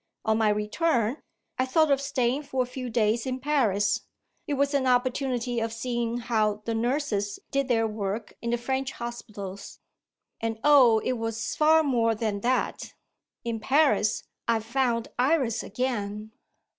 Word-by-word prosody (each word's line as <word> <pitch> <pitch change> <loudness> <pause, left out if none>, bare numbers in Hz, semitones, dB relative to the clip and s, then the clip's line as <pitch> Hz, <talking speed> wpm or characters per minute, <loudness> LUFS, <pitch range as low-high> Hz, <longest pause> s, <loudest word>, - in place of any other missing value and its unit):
On 220 0 +2
my 220 -1 +3
return, 225 +4 +1 0.4
I 255 - +2
thought 310 +3 +3
of 275 0 +3
staying 265 -1 0
for 265 -3 -1
a - - -5
few 250 0 -6
days 225 +1 +1
in 260 0 -2
Paris 225 -8 +1 0.5
it 290 - 0
was 280 +1 +1
an 270 -2 +1
opportunity 250 -1 +1
of 225 0 -2
seeing 235 0 -2
how 215 -3 0
the 230 - -1
nurses 225 -4 -1
did 275 -1 0
their 225 -3 +2
work 210 0 -4
in 235 - -3
the 240 - +1
French 265 +2 -2
hospitals. 215 -5 -7 0.6
And, 225 -1 -2
oh, 270 -6 +7
it 255 -2 0
was 225 0 -3
far 315 +1 +5
more 230 -5 +2
than 215 -2 -2
that! 250 +3 -1 0.5
In 230 -1 -3
Paris, 270 -4 +2 0.2
I 230 -1 +3
found 235 0 0
Iris 255 -4 +2
again." 215 -2 -3
240 Hz, 155 wpm, -27 LUFS, 220-265 Hz, 0.6 s, oh